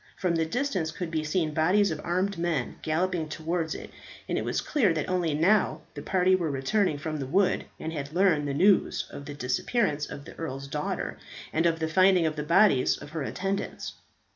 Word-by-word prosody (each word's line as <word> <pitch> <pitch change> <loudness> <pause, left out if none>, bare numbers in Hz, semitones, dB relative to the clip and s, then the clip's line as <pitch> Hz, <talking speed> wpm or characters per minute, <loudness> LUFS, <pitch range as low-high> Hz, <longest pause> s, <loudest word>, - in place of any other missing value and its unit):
From 180 -3 0
the 165 -1 +1
distance 195 - -1
could 165 +1 -5
be 160 -2 -1
seen 155 0 0
bodies 180 +5 +3
of 155 -1 -4
armed 185 +1 -1
men 165 -7 -1
galloping 165 0 -1
towards 160 +1 -2
it, - - -9 0.4
and - - -1
it - - -1
was - - -1
clear 245 - +2
that 155 - -2
only 175 -4 0
now 190 +7 +3
the - - -7
party 185 0 +2
were 170 -4 -1
returning 150 +5 +1
from 155 +1 -4
the 135 - -4
wood, 190 +6 +2
and 160 +1 -4
had 140 -2 -5
learned 170 -4 +2
the 140 - -1
news 195 +5 +3
of 140 - -8
the 145 0 -7
disappearance 145 - 0
of 140 - -8
the - - -10
Earl's 140 -4 -4
daughter, 150 +2 -3 0.3
and 160 +2 +3
of 165 -1 +1
the 160 -1 -1
finding 185 +1 +4
of 155 -1 0
the 150 - -3
bodies 170 -3 +4
of 145 0 -11
her 160 -1 -4
attendants. 195 +7 -3
165 Hz, 205 wpm, -27 LUFS, 150-185 Hz, 0.4 s, finding